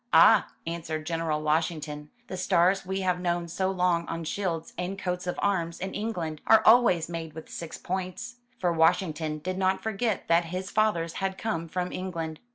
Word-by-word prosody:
"Ah," - - +7 0.2
answered 160 -2 -4
General 165 -2 -1
Washington, 150 -1 -1 0.2
"the 190 - -6
stars 185 +1 +2
we 190 +1 -1
have 180 -1 +1
known 175 -1 -1
so 190 +3 -1
long 180 -3 +1
on 165 0 -4
shields 165 -1 -3
and 180 +2 -3
coats 180 -2 -3
of 180 - -2
arms 170 -5 0
in 190 +1 -4
England, 175 -8 -3
are 220 -1 +7
always 220 -8 +6
made 165 -2 -5
with 160 - -9
six 165 -2 -6
points." 190 +7 -4 0.2
For 175 -5 +1
Washington 160 -2 +2
did 185 +5 -4
not 190 0 +1
forget 220 0 -1
that 170 +1 +4
his 185 +3 -5
fathers 190 -7 +1
had 190 0 -1
come 170 -7 -2
from 180 +2 -2
England. 165 -4 -4
175 Hz, 175 wpm, -28 LUFS, 165-190 Hz, 0.2 s, Ah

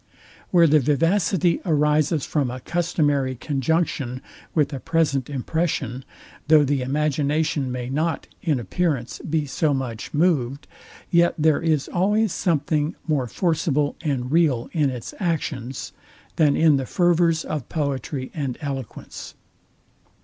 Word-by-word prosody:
Where 170 -2 +5
the 155 -1 +5
vivacity 165 +5 +2
arises 150 -2 +2
from 145 -5 0
a 125 +1 -5
customary 145 -4 0
conjunction 135 -1 -1 0.3
with 150 -2 +2
a 135 - -4
present 150 -4 0
impression; 140 -2 -2 0.4
though 155 -1 +6
the 140 -1 0
imagination 145 +1 0
may 125 -1 -4
not, 155 +5 -1 0.2
in 150 -7 0
appearance, 140 -1 -2
be 155 -1 -1
so 145 +1 0
much 120 -4 -5
moved; 145 -5 +1 0.5
yet 170 0 +4
there 155 -1 +3
is 155 -4 +1
always 205 +3 +1
something 155 -2 0
more 145 -6 0
forcible 150 - 0
and 130 -5 -2
real 150 -8 +2
in 150 -4 +2
its 125 -3 -6
actions, 145 - -3 0.4
than 150 -3 +3
in 155 -3 +4
the 135 -2 -3
fervors 170 -2 +2
of 145 -5 -4
poetry 140 -3 -3
and 140 -5 -3
eloquence. 135 -5 -7
150 Hz, 125 wpm, -23 LUFS, 135-165 Hz, 0.5 s, though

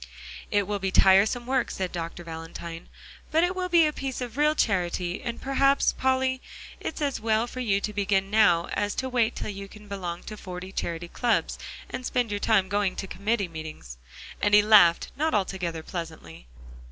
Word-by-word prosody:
"It 205 -1 +2
will 205 +1 -2
be 190 0 -1
tiresome 195 +6 +4
work," 260 0 0
said 185 -1 -3
Dr. 170 0 -5
Valentine, 165 0 -8 0.4
"but 320 +2 +3
it 360 +1 +1
will 365 -1 -2
be 340 -2 +6
a 300 - 0
piece 270 -3 -4
of 245 -3 -5
real 300 +2 +3
charity, 180 - 0
and 235 -1 -4
perhaps, 275 +1 +3
Polly, 260 0 +1 0.4
it's 310 - -4
as 280 -5 -1
well 220 +1 +2
for 250 +1 -8
you 205 -6 +1
to 210 - -3
begin 195 -1 0
now 175 -6 +4
as 205 0 -1
to 260 - -2
wait 245 -3 +1
till - - -4
you 200 0 -7
can 210 +1 -14
belong 180 -4 -5
to 215 - -7
forty 185 -1 -7
charity 170 -2 -3
clubs, 235 +6 0 0.3
and 255 - -6
spend 245 -3 0
your 205 - -1
time 200 -3 +3
going 200 -1 0
to - - -4
committee 200 +2 -1
meetings." 155 - -8 0.4
And 205 0 +4
he 210 - +7
laughed 200 -6 +6
not 315 -1 +1
altogether 180 -5 -2
pleasantly. 160 - -8
205 Hz, 190 wpm, -26 LUFS, 180-245 Hz, 0.4 s, he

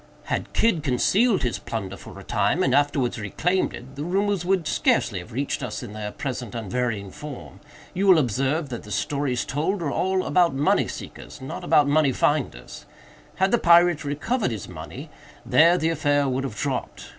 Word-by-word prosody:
Had - - -3
Kidd 225 -8 +2
concealed 185 - +2
his 125 - -1
plunder 100 -4 -5
for - - -11
a - - -10
time, - - +1
and - - +2
afterwards 140 -5 +1
reclaimed 175 - 0
it, 125 +2 -11
the 145 - -4
rumors 195 +2 0
would 185 -2 +1
scarcely 155 - +1
have 90 +7 -11
reached 135 +4 -2
us 125 -3 -5
in 110 -4 -8
their 105 -1 -5
present 125 -5 -5
unvarying 110 -2 -2
form. 150 -4 -9 0.3
You 195 +2 0
will 185 -3 +8
observe 135 +3 0
that 120 - -5
the - - -13
stories 135 +2 -1
told 160 +8 -1
are 145 - -1
all 190 +3 0
about 175 -6 +3
money 145 +2 +2
seekers, - - -9
not 130 - -7
about 145 -1 +4
money 145 -2 +3
finders. 130 - -1 0.5
Had 190 +1 +1
the 240 - +3
pirate 170 -2 +5
recovered 150 - -1
his 110 -5 -5
money, - - -9 0.3
there 170 +3 +5
the 160 - +1
affair 145 -3 +1
would 135 +1 -1
have 115 - -5
dropped. - - -4
145 Hz, 180 wpm, -24 LUFS, 125-175 Hz, 0.5 s, will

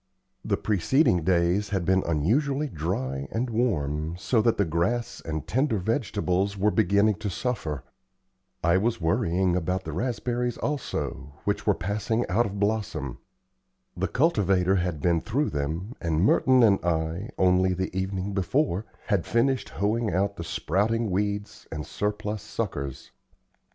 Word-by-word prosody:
The - - 0
preceding 105 - +2
days 90 +4 +2
had 95 -4 -1
been 95 +1 +3
unusually 135 - +1
dry 70 - -3
and 120 +2 -2
warm, 80 - 0
so 110 +5 +2
that 115 +1 +2
the 100 - +3
grass 85 +9 -1
and 80 -2 -4
tender 130 -2 +1
vegetables 100 -2 0
were 105 +2 +2
beginning 100 -1 +3
to 105 - -2
suffer. 85 - -3 0.8
I 85 +3 +4
was 115 -1 0
worrying 85 +2 +1
about 90 +2 -1
the 80 - -5
raspberries 120 - -1
also, 130 - -3
which - - -1
were - - +4
passing 105 +5 -1
out 110 +6 +2
of 100 0 -6
blossom. 100 - -1 0.8
The - - -1
cultivator 95 - +2
had 85 -5 -2
been 85 0 +2
through 130 - 0
them, 80 - -3
and 80 0 +1
Merton 130 +1 +5
and 100 -4 +4
I, 85 +4 -1
only 95 0 +3
the 95 0 -3
evening 95 +1 -2
before, 100 - 0 0.2
had 100 -6 0
finished 120 -1 +1
hoeing 110 +2 0
out 100 +2 0
the 85 - -5
sprouting 105 +6 0
weeds 100 +2 -2
and 75 -1 -4
surplus 105 0 -3
suckers. 70 - -4
100 Hz, 145 wpm, -26 LUFS, 85-110 Hz, 0.8 s, Merton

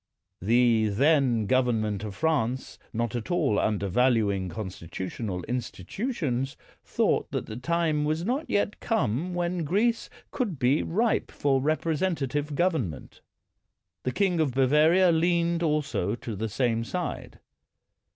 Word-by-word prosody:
The 115 +1 +3
then 130 -1 +3
govern 125 0 +2
ment 105 -2 -2
of 105 -2 -6
France, 130 -6 -1
not 120 0 -2
at 120 - -4
all 155 - +2
undervaluing 100 -1 +1
con 95 +3 -5
stitutional 90 +2 -5
institutions, 130 - -3 0.3
thought - - 0
that - - -3
the 110 - -7
time 155 +3 0
was 155 +3 -1
not 270 +8 -1
yet 205 +1 0
come 180 - -1
when 175 0 -1
Greece 220 +9 +1 0.2
could 210 - -2
be 130 +3 +2
ripe 220 +7 0
for 135 -2 +1
representative 150 -2 -1
government. 140 - -2 0.8
The 130 - -2
king 180 +3 +1
of 140 -6 0
Bavaria 155 +7 +4
leaned 170 0 +1
also 150 - 0
to 115 -2 -6
the 110 +3 -3
same 115 0 0
side. 115 - -5
135 Hz, 130 wpm, -27 LUFS, 115-170 Hz, 0.8 s, Bavaria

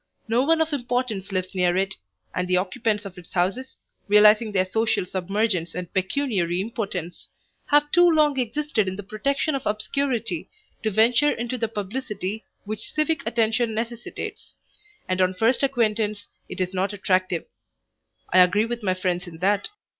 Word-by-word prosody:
No 230 +2 +2
one 320 +4 +3
of 320 -1 0
importance 245 -7 -2
lives 185 0 -2
near 180 -1 +2
it, 190 0 0 0.4
and 180 0 -1
the 180 0 +3
occupants 215 +2 -1
of 185 -2 -8
its 175 - -14
houses, 200 +9 -1 0.3
realizing 210 +2 +6
their 185 -2 +2
social 220 0 0
submergence 185 -1 -1
and 180 -1 -6
pecuniary 190 -4 0
impotence, 195 -5 -4 0.4
have 295 0 +3
too 350 +1 +6
long 300 -4 +3
existed 245 -3 0
in 185 - -2
the 205 - -7
protection 275 +9 -1
of 275 - -2
obscurity 245 +6 -1 0.3
to 220 - 0
venture 230 +7 +4
into 240 +2 -3
the 230 -2 -1
publicity 210 -1 -4 0.2
which 215 0 -6
civic 305 -1 0
attention 225 0 +1
necessitates, 235 +1 -6 0.5
and 185 0 0
on 185 0 +2
first 225 +6 +2
acquaintance 215 -6 0 0.2
it - - -7
is 185 0 -1
not 190 +2 -1
attractive. 185 -3 0 0.9
I 185 - +7
agree 180 +4 +5
with 235 0 -4
my 185 -3 0
friends 180 -1 -2
in 165 -2 -9
that. 200 +3 +1
215 Hz, 160 wpm, -24 LUFS, 185-245 Hz, 0.9 s, I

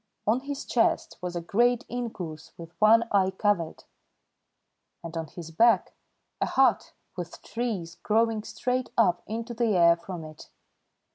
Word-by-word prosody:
On 220 +4 +3
his 280 +1 -6
chest 235 - +1
was 180 -1 -4
a 175 - -2
great 240 +7 +2
inkoos 185 -11 -6
with 170 0 -10
one 225 +2 +6
eye 190 -2 +3
covered, 190 -4 -1 1.2
and 165 0 -7
on 165 -1 -3
his 165 +1 -9
back 225 +3 +3 0.5
a - - +2
hut - - +2 0.2
with - - -7
trees 200 -8 -4
growing 225 0 +2
straight 250 +3 -2
up 180 -7 +3
into 230 +2 -4
the 225 -4 +1
air 170 -1 +6
from 170 0 -8
it. 155 0 -12
205 Hz, 145 wpm, -27 LUFS, 170-230 Hz, 1.2 s, one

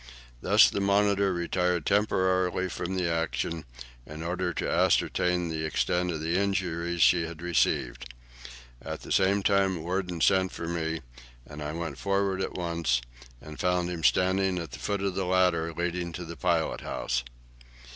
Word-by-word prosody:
Thus - - +6
the - - -2
'Monitor' 100 0 +3
retired 90 -1 0
temporarily 95 -3 +1
from 90 +2 -4
the 90 -2 0
action, 80 -1 -2 0.4
in 75 +5 -8
order 90 +1 -1
to - - -3
ascertain 90 -1 +2
the 80 -1 -3
extent 90 +3 0
of 80 -3 -3
the 85 +3 0
injuries 85 -4 0
she 85 0 +4
had 80 -1 -9
received. 70 -7 0 0.7
At - - -6
the - - -9
same 100 +1 +3
time 95 -4 +2
Worden 90 0 -2
sent 95 +2 +3
for 85 - -5
me, 80 -2 -2 0.4
and 75 0 -10
I 75 0 -4
went 85 0 -5
forward 100 -1 0
at - - -3
once, 85 -8 0 0.4
and 75 +3 -11
found 90 -1 +1
him 85 -2 -5
standing 95 +2 +2
at 85 -2 -5
the - - -8
foot 100 -1 -2
of 100 -2 0
the 95 0 -2
ladder 90 -3 +2
leading 85 +1 -3
to 90 +1 -6
the 85 +1 -8
pilot 85 -2 0
house. 60 0 -2
90 Hz, 165 wpm, -28 LUFS, 80-95 Hz, 0.7 s, Thus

